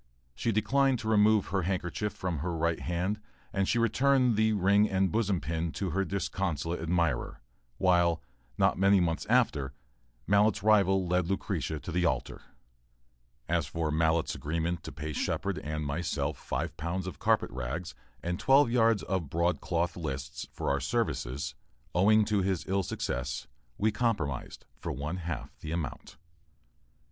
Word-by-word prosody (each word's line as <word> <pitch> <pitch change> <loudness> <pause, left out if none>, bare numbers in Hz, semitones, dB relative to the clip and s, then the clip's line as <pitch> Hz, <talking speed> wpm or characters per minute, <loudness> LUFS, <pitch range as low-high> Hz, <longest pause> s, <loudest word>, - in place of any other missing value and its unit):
She 115 - -1
declined 135 +5 +2
to 110 - -6
remove 105 -1 +4
her 95 0 +1
handkerchief 95 +3 -2
from 90 -5 -3
her 85 +3 -2
right 85 +1 +1
hand 90 +5 -2 0.3
and 95 -2 +1
she 120 - +2
returned 125 +1 +3
the 110 +1 +3
"ring 100 +1 +4
and 95 -1 +1
bosom 105 -5 +1
pin" 80 0 -2
to 95 -3 -2
her 95 +3 +1
disconsolate 90 -3 -2
admirer, 85 -7 0 0.4
while, 85 -3 +3 0.3
not - - +3
many 100 0 +5
months 85 -2 0
after, 75 - +2 0.5
Mallett's 105 0 +3
rival 95 -3 +4
led 90 0 +1
Lucretia 85 -5 -2
to 90 - -6
the 90 +1 +1
altar. 65 -7 -1 1.1
As - - +1
for 80 -2 -2
Mallett's 80 +1 +2
agreement 85 +3 -2
to - - -5
pay 75 +3 -5
Shepard - - -1
and 75 0 -4
myself 80 +5 -1
five - - -3
pounds 85 +4 -3
of 90 - -6
carpet - - +2
rags 65 +9 -4 0.3
and 90 +2 -2
twelve 135 +2 +5
yards 115 -3 +3
of 90 -6 -2
broadcloth 85 +1 0
"lists," 70 -6 -5
for - - -2
our 70 - +1
services, 70 - -2 0.4
owing 105 +4 +5
to 105 -2 +1
his 95 -6 -1
ill 95 +1 +1
success, 65 -7 -3 0.3
we 110 +2 +2
compromised 100 - -2
for - - -4
one 75 +6 -3
half 85 -2 -5
the 80 - -6
amount. 80 -6 -5
90 Hz, 155 wpm, -30 LUFS, 80-100 Hz, 1.1 s, many